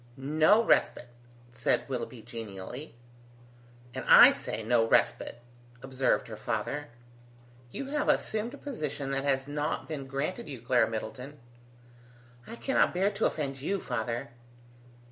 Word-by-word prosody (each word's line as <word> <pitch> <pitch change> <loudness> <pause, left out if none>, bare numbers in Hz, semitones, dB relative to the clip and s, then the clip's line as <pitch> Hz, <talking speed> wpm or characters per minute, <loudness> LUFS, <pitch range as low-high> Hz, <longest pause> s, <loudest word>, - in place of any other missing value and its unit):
"No 155 +11 +4
respite!" 125 - +2 0.4
said 120 0 0
Willoughby, 125 -3 -5
genially. 115 +3 -8 1.0
"And - - -5
I - - +10
say, 110 - -4
no 115 +1 +3
respite!" 120 +1 +1 0.4
observed 135 -1 0
her 110 - -7
father. 110 +7 -3 0.8
"You 275 - -5
have 295 +1 0
assumed 220 +5 0
a - - -13
position 150 - -4
that 135 0 -1
has 135 -1 +1
not 145 +1 -2
been 145 -4 -5
granted 150 - -3
you, 135 -4 -7
Clara 120 +1 +2
Middleton." 125 +6 -6 1.1
"I 230 - -7
cannot 270 -6 +1
bear 195 +3 +2
to 205 +2 +1
offend 135 -3 -4
you, 195 +7 -1
father." 120 -3 -3
135 Hz, 130 wpm, -29 LUFS, 120-155 Hz, 1.1 s, I